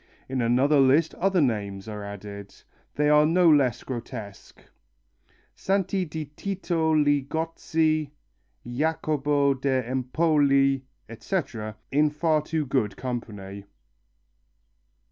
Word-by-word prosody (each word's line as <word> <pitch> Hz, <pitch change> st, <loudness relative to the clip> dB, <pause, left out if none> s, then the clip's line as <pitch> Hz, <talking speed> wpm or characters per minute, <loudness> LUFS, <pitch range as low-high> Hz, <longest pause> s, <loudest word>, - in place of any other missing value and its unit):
In 130 Hz, -1 st, -2 dB
another 130 Hz, +5 st, +3 dB
list 140 Hz, +5 st, +4 dB
other 190 Hz, -1 st, +1 dB
names 100 Hz, -6 st, -2 dB
are 105 Hz, -1 st, -6 dB
added. 100 Hz, 0 st, -9 dB, 0.4 s
They 150 Hz, 0 st, +2 dB
are 150 Hz, 0 st, +6 dB
no 170 Hz, +3 st, +3 dB
less 140 Hz, -7 st, +3 dB
grotesque 115 Hz, -5 st, -8 dB, 0.9 s
Santi 195 Hz, -1 st, 0 dB
di 155 Hz, -1 st, -5 dB
Tito 165 Hz, +1 st, -2 dB
Ligozzi, 155 Hz, +1 st, 0 dB, 0.6 s
Jacopo 145 Hz, +1 st, 0 dB
da 130 Hz, -1 st, 0 dB
Empoli, 135 Hz, +1 st, +2 dB, 0.2 s
etc, 115 Hz, -, -4 dB, 0.2 s
in 150 Hz, +2 st, +3 dB
far 155 Hz, +1 st, +1 dB
too 155 Hz, 0 st, -2 dB
good 110 Hz, -7 st, -1 dB
company. 105 Hz, -6 st, -6 dB
140 Hz, 100 wpm, -25 LUFS, 120-155 Hz, 0.9 s, are